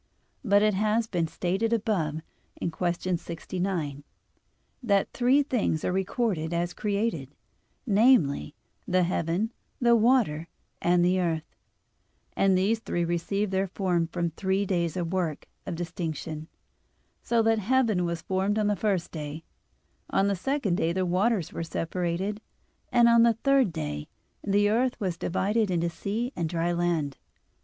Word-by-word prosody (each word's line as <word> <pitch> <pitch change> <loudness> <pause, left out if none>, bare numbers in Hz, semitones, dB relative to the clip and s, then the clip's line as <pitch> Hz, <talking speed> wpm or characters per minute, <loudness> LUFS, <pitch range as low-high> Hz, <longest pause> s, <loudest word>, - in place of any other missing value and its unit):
But 205 -3 +4
it 215 0 +3
has 215 +3 +1
been 175 -6 -1
stated 190 +7 -1
above 185 -9 0 0.4
(Q. 175 +2 -1
69, 175 +3 -4
A. 145 -4 -3
1), 145 - -14 0.8
that 200 -5 +1
three 255 +4 +3
things 240 - 0
are - - +1
recorded 190 -3 -1
as 175 +1 -1
created, 200 - -2 0.5
namely, 205 - +3 0.3
the 185 0 +3
heaven, 175 +5 0 0.3
the 235 -1 +5
water, 220 -9 +2 0.3
and 175 0 +3
the 185 +1 +3
earth; 160 -3 -2 0.8
and 195 -1 +3
these 210 +4 +2
three 175 -6 -2
received 185 +4 -1
their 190 +1 +1
form 180 -3 0
from 170 0 -2
the - - -20
three 190 +2 0
days' 170 -4 0
work 175 -3 -2 0.2
of 180 - -3
distinction, 160 -2 -5 0.7
so 230 -1 +2
that 225 0 +3
heaven 220 -3 +2
was 170 -2 -3
formed 190 +4 0
on 215 - +1
the 205 0 +2
first 195 -5 -1
day; 155 0 -6 0.7
on 195 - +2
the 200 - +1
second 205 -2 -1
day 165 - +1
the 185 +1 0
waters 185 +1 +1
were - - -4
separated; 175 +5 -2 0.5
and 240 -1 +5
on 235 0 +6
the 235 0 +5
third 275 -7 +4
day, 75 - -4 0.4
the 205 0 +3
earth 240 +4 +1
was 185 -4 -1
divided 205 +5 0
into 170 -1 0
sea 220 - -3
and 165 -2 -2
dry 170 +1 0
land. 170 -5 0
185 Hz, 150 wpm, -27 LUFS, 170-215 Hz, 0.8 s, on